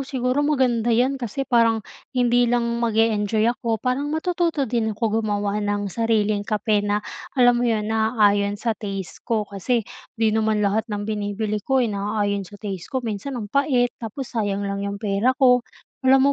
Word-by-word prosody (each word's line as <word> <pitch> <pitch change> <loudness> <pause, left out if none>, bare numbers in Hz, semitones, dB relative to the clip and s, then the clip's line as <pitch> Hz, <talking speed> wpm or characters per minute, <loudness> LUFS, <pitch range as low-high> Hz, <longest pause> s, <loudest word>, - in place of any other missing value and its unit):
siguro 255 0 0
maganda 260 -6 +1
'yan, 260 +4 +2
kasi 245 +3 -3
parang 230 -3 +3 0.3
hindi 245 -1 +3
lang 240 0 +2 0.2
mag-e-enjoy 220 -2 +2
ako 230 -2 -2
parang 260 +3 -1
matututo 335 -2 0
din 225 -3 -1
ako 225 0 0
gumawa 205 -1 -1
ng 205 -2 -2
sariling 215 -3 +1
kape 210 0 +1
na, 205 0 +1 0.4
alam 245 -1 +5
mo - - +1
'yon, 215 -2 0
naaayon 210 -2 +2
sa 225 +1 -1
taste 195 -4 -6
ko 225 -3 0
kasi 205 +4 -1 0.3
'di 220 -1 +2
naman 220 -1 +1
lahat 215 +3 0
ng 205 0 -2
binibili 210 0 -2
ko 270 -1 +1
eh, 240 - +1
naayon 205 0 -1
sa 205 - -12
taste 195 -5 -6
ko. 260 - -1
Minsan, 230 +5 -4
ang 215 - -5
pait 260 -4 +2
tapos 235 +4 -5
sayang 205 -3 -1
lang 200 0 -3
'yung 200 0 -3
pera 210 +4 +1
ko. 250 -2 +5 0.4
Alam 265 0 +5
220 Hz, 175 wpm, -23 LUFS, 205-245 Hz, 0.4 s, alam